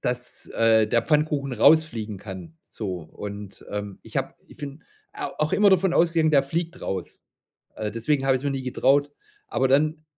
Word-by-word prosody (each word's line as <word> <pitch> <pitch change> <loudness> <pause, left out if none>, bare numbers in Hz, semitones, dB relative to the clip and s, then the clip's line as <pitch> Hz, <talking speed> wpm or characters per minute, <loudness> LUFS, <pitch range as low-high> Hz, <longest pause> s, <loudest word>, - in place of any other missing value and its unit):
dass, 125 0 -4
äh, 110 -1 +4
der 115 +2 +2
Pfannkuchen 150 -3 +1
rausfliegen 120 -5 +3
kann, 90 -5 -9
so. 95 -5 -4
Und, 100 +4 -9
ähm, 105 -1 -5
ich - - -9
hab - - -2
ich - - -16
bin 145 +1 -8 0.3
a - - -4
auch 150 0 0
immer 205 -1 +5
davon 190 -1 +3
ausgegangen, 165 -2 +3
der 140 -3 +5
fliegt 165 +4 -3
raus. 95 -3 -5 0.5
Äh, 105 -1 -3
deswegen 135 +5 0
hab 135 - +4
ich's 130 - -2
mir 140 - +1
nie 135 -1 -3
getraut, 140 +3 +2 0.4
aber 130 - +1
dann 155 +3 +2
135 Hz, 175 wpm, -25 LUFS, 105-155 Hz, 0.5 s, immer